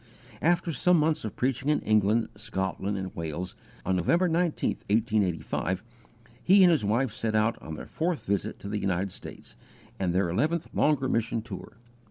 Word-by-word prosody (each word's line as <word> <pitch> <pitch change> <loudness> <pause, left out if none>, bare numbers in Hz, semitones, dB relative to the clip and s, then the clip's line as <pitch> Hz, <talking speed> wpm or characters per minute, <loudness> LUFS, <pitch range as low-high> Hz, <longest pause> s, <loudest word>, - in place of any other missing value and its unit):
After 175 0 +2
some 180 +6 +4
months 155 0 +1
of 110 - -5
preaching 130 +2 0
in 150 - +3
England, 110 +1 +2
Scotland, 100 -1 -3
and 95 -1 -5
Wales, 85 +2 -4 0.3
on 95 0 +1
November 170 - +3
19, 170 -1 +1 0.2
1885, 100 -4 0 0.6
he 195 +1 +7
and 180 - +7
his 155 -9 +2
wife 115 +5 +1
set 110 -1 -2
out 110 +2 +3
on 80 - -6
their - - -8
fourth 165 0 -2
visit 100 0 -1
to - - -7
the 105 +1 -2
United 95 0 -1
States, - - -10 0.4
and 95 -2 +1
their 95 +2 +2
_eleventh 150 - 0
longer 145 -3 +2
mission 115 -2 0
tour. 110 -2 -9
110 Hz, 170 wpm, -28 LUFS, 95-150 Hz, 0.6 s, he